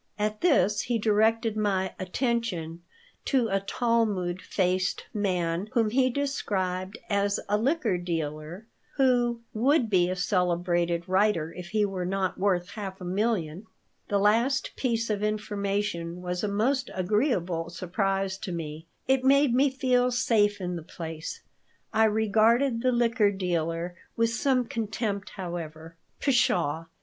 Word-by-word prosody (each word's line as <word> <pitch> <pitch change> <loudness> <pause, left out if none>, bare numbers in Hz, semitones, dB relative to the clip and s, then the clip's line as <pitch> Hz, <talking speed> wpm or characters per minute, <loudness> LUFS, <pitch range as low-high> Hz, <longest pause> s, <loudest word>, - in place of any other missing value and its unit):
At 210 0 -2
this 210 - +3
he 240 -1 -1
directed 220 +1 +2
my 195 -3 0
attention 185 -5 -2 0.4
to 250 -5 +2
a 195 - +1
"Talmud 200 -4 0
faced" 185 0 0
man 180 -2 -1
whom 225 -4 +2
he 255 +1 +3
described 200 -9 -2
as 200 -2 +1
a 205 - +2
liquor 230 - +1
dealer 165 +2 -4 0.3
who 245 -3 +2
"would 245 +1 +2
be 180 -2 +3
a 185 - -1
celebrated 175 -2 0
writer 185 -4 +2
if 180 -1 -8
he 210 +3 +1
were 185 -3 -3
not 190 0 -1
worth 185 -2 +1
half 195 -3 -6
a - - -9
million." 190 -2 -1 0.4
The 205 - +1
last 230 +7 +2
piece 230 -3 -1
of 205 -1 -1
information 200 -5 -2
was 180 +1 -3
a - - +1
most 255 +7 0
agreeable 185 - 0
surprise 195 +2 -1
to 195 - -5
me. 160 -1 -6 0.2
It 265 0 +3
made 275 -1 +4
me 275 +3 +4
feel 255 -2 +2
safe 210 -4 +2
in 180 -2 -3
the - - -6
place. 160 -1 -7 0.5
I 220 0 +5
regarded 220 +4 +3
the 255 +1 +2
liquor 235 -3 +3
dealer 175 -3 -2 0.2
with 230 0 +2
some 255 +1 +1
contempt, 220 -4 -3
however. 165 -3 -6 0.2
"Pshaw! 170 - +1
205 Hz, 140 wpm, -27 LUFS, 180-230 Hz, 0.5 s, I